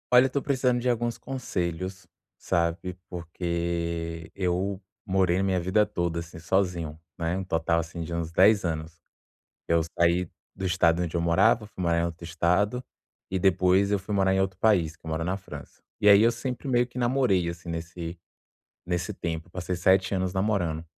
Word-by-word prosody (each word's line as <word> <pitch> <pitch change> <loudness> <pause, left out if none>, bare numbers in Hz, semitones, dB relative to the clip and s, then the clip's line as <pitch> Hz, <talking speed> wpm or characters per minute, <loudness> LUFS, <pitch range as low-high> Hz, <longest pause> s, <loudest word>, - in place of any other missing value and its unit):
Olha, 125 +1 +8
tô 140 +2 -2
precisando 130 -3 +1
de 125 - +1
alguns 120 -1 0
conselhos, 95 -7 -4 0.3
sabe, 85 +2 -1
porque 85 -1 -3
eu 95 +1 -1 0.2
morei 95 -2 +2
a 95 - +1
minha 95 -1 +1
vida 95 +4 +2
toda, 85 -3 -2
assim, 85 +1 -9
sozinho, 85 -3 -1 0.2
né, 85 +1 -1
um 95 - -4
total 85 -1 +1
assim 85 +1 -5
de 85 +1 -6
uns 85 -1 -2
10 100 +4 +4
anos. 80 0 -4 0.7
Eu 85 0 +3 0.2
saí 85 +1 +3 0.3
do 95 - -4
estado 90 -2 +3
onde 85 0 -2
eu - - +1
morava, 100 +6 +3
fui 95 -3 -7
morar 85 -1 +2
em 85 - +1
outro 85 0 -6
Estado, 90 +7 +1 0.5
e 95 - -1
depois 95 +1 +3
eu 100 - +2
fui 100 +2 -4
morar 95 -1 +3
em 95 - +2
outro 95 -1 -1
país, 90 -7 +2
que 85 - -23
eu - - -5
moro 80 +1 -2
na 90 +2 0
França. 100 - -10 0.2
E 105 - +2
aí 100 0 +8
eu 115 - +5
sempre 125 +3 -4
meio 120 -1 +3
que 125 - -11
namorei, 120 -8 +2
assim, 85 +1 -8
nesse 85 +1 -5 0.7
nesse 90 -1 -2
tempo. 80 0 -4
Passei 90 +1 -3
7 95 +2 +3
anos 95 -1 -1
namorando. 95 -5 0
90 Hz, 185 wpm, -27 LUFS, 85-100 Hz, 0.7 s, Olha